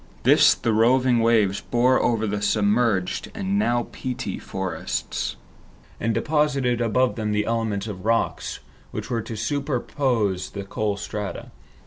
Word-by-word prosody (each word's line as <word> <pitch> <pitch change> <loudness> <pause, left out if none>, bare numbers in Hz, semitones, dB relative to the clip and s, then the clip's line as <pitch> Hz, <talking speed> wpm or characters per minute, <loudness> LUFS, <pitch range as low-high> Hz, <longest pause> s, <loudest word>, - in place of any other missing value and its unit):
This - - +6
the 115 - -1
roving 125 +2 +4
waves 110 -4 +3
bore 125 +2 +2
over 115 -2 +1
the 105 -1 -2
submerged 105 -1 +1
and 200 -1 0
now 120 - +1
peaty 130 -1 -4
forests, 95 -1 -3 0.6
and 115 - 0
deposited 140 -4 +1
above 125 +3 +1
them 105 -1 -1
the 105 0 +1
elements 110 -3 -1
of 100 -4 -7
rocks 115 +1 -1 0.3
which - - -6
were 115 -1 0
to 110 - -7
superpose 125 -6 -1
the 100 - -4
coal 100 +1 -2
strata. 105 -1 -5
115 Hz, 135 wpm, -24 LUFS, 105-125 Hz, 0.6 s, This